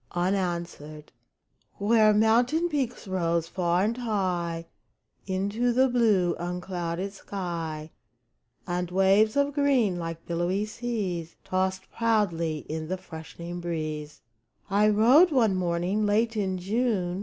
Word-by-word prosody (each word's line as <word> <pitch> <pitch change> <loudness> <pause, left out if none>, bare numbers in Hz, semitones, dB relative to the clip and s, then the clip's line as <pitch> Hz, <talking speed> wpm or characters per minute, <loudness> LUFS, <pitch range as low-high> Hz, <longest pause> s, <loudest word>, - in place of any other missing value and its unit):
UNANSWERED 175 -5 -2 0.7
Where 215 +1 +4
mountain 240 +10 +3
peaks 260 -8 -2
rose 170 -3 0
far 175 0 0
and 225 +3 0
high 180 -8 -2 0.6
Into 200 +6 0
the 260 +2 +4
blue, 215 -8 +2
unclouded 180 +1 -4
sky, 165 -6 -5 0.7
And 180 0 -2
waves 195 +4 +3
of 285 0 +2
green, 260 -10 +2
like 165 -1 -6
billowy 175 +4 -1
seas, 205 -8 -4
Tossed 185 0 -1
proudly 170 -9 0
in 155 0 -4
the 185 +3 -2
freshening 170 0 -8
breeze, 155 -3 -4 0.5
I 210 +2 +4
rode 245 - +6
one 240 -9 +3
morning, 185 +3 0
late 225 +2 +1
in 190 -3 -1
June. 195 -2 -1
190 Hz, 115 wpm, -27 LUFS, 170-220 Hz, 0.7 s, rode